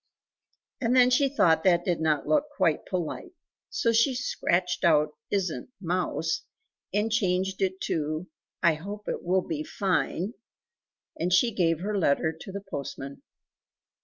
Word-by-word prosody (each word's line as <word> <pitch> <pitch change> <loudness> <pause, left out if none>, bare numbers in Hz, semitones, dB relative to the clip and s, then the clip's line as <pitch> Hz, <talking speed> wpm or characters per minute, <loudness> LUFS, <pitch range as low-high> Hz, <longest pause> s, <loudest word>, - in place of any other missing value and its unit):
And 245 0 +2
then 250 -1 +6
she 275 +2 +4
thought 165 - +3
that 175 -2 +3
did 175 -3 0
not 155 -3 +1
look 300 -1 +2
quite 165 -5 +1
polite; 185 - -4 0.4
so 235 - +1
she 230 +3 +3
scratched 180 -7 0
out 155 -3 +4 0.2
"isn't 180 - -2
mouse" 175 -3 -1 0.5
and 210 +3 0
changed 190 -3 0
it 190 0 0
to 155 +2 -2 0.4
"I 170 -2 +6
hope 200 +7 -7
it - - -2
will 185 +1 +2
be 150 -2 -3
fine," 190 +2 -1 0.9
and 175 +2 0
she 230 +6 +4
gave 165 -4 +1
her 210 +2 -2
letter 160 -3 +2
to 165 +4 -9
the 200 +1 -5
postman. 140 -6 -7
180 Hz, 145 wpm, -27 LUFS, 160-205 Hz, 0.9 s, then